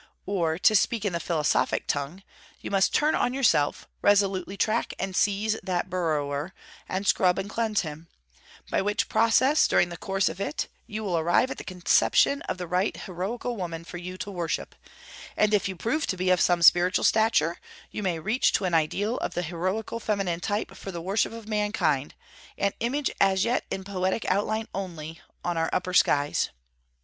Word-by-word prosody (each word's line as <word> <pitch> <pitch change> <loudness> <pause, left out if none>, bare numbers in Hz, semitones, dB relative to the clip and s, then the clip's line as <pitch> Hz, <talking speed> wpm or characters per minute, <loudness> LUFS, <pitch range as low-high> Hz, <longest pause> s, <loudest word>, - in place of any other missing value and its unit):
Or, 170 -5 0
to 200 - +4
speak 215 +2 +2
in 200 - 0
the 170 - -1
philosophic 160 -3 0
tongue, 145 +7 -3 0.4
you - - -7
must 195 -1 +3
turn 300 +1 +2
on 245 - 0
yourself, 225 - +2
resolutely 195 -1 +2
track 215 - 0
and 190 -1 -4
seize 210 +3 +1
that 185 -1 -2
burrower, 155 -2 -2 0.3
and 190 +2 -2
scrub 180 -1 +3
and 195 - -3
cleanse 220 -1 0
him; 155 0 -8 0.6
by - - +2
which 205 +1 0
process, 230 +7 +4
during 175 - +3
the 175 - -7
course 195 +1 0
of 190 - -4
it, 150 - -2 0.2
you 215 +1 -5
will 180 -5 0
arrive 175 +11 +2
at - - -5
the - - -7
conception 185 +9 +2
of - - -2
the 180 - -4
right 180 +4 0
heroical 210 +7 -4
woman 170 -5 -5
for 175 - -8
you 180 +1 -7
to 200 - -6
worship: 175 -4 -3 0.6
and 215 0 +3
if 200 -1 +2
you 190 - -5
prove 235 - -1
to 185 - -2
be 185 0 +1
of 180 - +3
some 175 -1 +3
spiritual 175 +3 +5
stature, 220 -7 +3 0.3
you - - -5
may 180 -4 -1
reach 215 +10 +1
to 195 - +1
an 180 - -1
ideal 195 +9 +1
of - - -4
the 175 - -1
heroical 185 +7 -3
feminine 195 -6 -1
type 205 +4 -3
for 195 - -7
the 170 - -5
worship 195 +6 0
of 225 -1 -9
mankind, 205 -10 0 0.4
an 200 - +1
image 270 +5 -1
as 190 -1 +3
yet 240 +2 0
in 190 - -4
poetic 190 +2 -2
outline 215 +3 0
only, 165 -4 -6 0.2
on 175 -1 -1
our 165 - 0
upper 180 0 -2
skies. 145 -4 +3
190 Hz, 185 wpm, -26 LUFS, 175-210 Hz, 0.6 s, spiritual